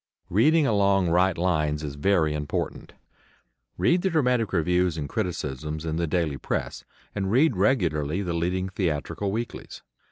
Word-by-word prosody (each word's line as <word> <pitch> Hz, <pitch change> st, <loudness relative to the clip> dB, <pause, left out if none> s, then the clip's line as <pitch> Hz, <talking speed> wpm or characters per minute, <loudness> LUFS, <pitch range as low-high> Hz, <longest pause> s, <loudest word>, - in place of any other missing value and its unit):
Reading 150 Hz, -, +4 dB
along 100 Hz, -5 st, +2 dB
right 90 Hz, +1 st, +3 dB
lines 75 Hz, -4 st, 0 dB
is 70 Hz, -2 st, -4 dB
very 80 Hz, 0 st, +1 dB
important. 75 Hz, -1 st, -4 dB, 0.8 s
Read 175 Hz, +1 st, +3 dB
the 190 Hz, -, +1 dB
dramatic 125 Hz, -, +1 dB
reviews 90 Hz, 0 st, +1 dB
and 75 Hz, -2 st, -3 dB
criticisms 75 Hz, -1 st, -4 dB
in 80 Hz, 0 st, -2 dB
the 85 Hz, 0 st, 0 dB
daily 80 Hz, -3 st, -1 dB
press, -, -, -3 dB, 0.3 s
and 95 Hz, -2 st, -2 dB
read 130 Hz, +2 st, +3 dB
regularly 90 Hz, -, +1 dB
the 90 Hz, -2 st, -2 dB
leading 90 Hz, +3 st, -1 dB
theatrical 95 Hz, +2 st, -2 dB
weeklies. 115 Hz, +3 st, -6 dB
90 Hz, 140 wpm, -25 LUFS, 75-100 Hz, 0.8 s, Reading